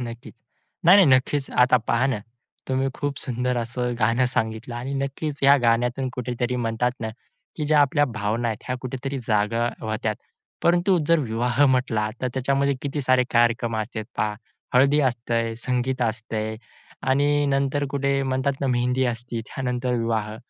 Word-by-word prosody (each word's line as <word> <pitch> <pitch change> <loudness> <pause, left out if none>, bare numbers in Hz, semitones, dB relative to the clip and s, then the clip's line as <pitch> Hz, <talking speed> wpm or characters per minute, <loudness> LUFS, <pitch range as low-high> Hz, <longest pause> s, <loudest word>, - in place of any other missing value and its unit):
नक्कीच. 120 0 -8 0.5
नाही-नाही, 185 0 +8
नक्कीच. 135 +2 -2
आता 125 0 +4
पहा 120 +3 +2
ना, 130 -6 -1 0.5
तुम्ही 130 +1 +1
खूप 145 -1 -3
सुंदर 125 0 -1
असं 120 +1 -2
गाणं 115 +3 +2
सांगितलं. 110 0 -2
आणि 125 +4 -4
नक्कीच 140 +2 -3
या 140 +1 +7
गाण्यातून 120 +3 +1
कुठेतरी 125 0 -2
म्हणतात 120 +1 0
ना 110 - -2 0.5
की 155 - -2
ज्या 150 0 +4
आपल्या 145 +1 +3
भावना 110 +3 -1
आहेत, 110 - -3
ह्या 125 0 -2
कुठेतरी 135 +2 -4
जाग्या 115 +2 +1
होतात. 110 0 -2 0.5
परंतु 175 +2 +3
जर 170 -1 +4
विवाह 120 +1 +1
म्हटला, 125 -5 +1
तर 130 - +1
त्याच्यामध्ये 140 +2 +1
किती 145 +1 -2
सारे 130 -1 +4
कार्यक्रम 115 -1 +2
असतात 110 0 -4
पहा 105 0 0 0.4
हळदी 140 +4 +5
असते, 115 -3 0
संगीत 125 +1 -1
असतं. 110 -1 -2 0.5
आणि 145 +2 +2
नंतर 140 +1 +1
कुठे 140 -1 0
म्हणतात 130 +1 0
ना 140 - 0
मेहंदी 125 +1 +1
असते, 115 0 -6
त्यानंतर 125 -1 -2
विवाह. 110 -2 -2
125 Hz, 150 wpm, -24 LUFS, 115-135 Hz, 0.5 s, नाही-नाही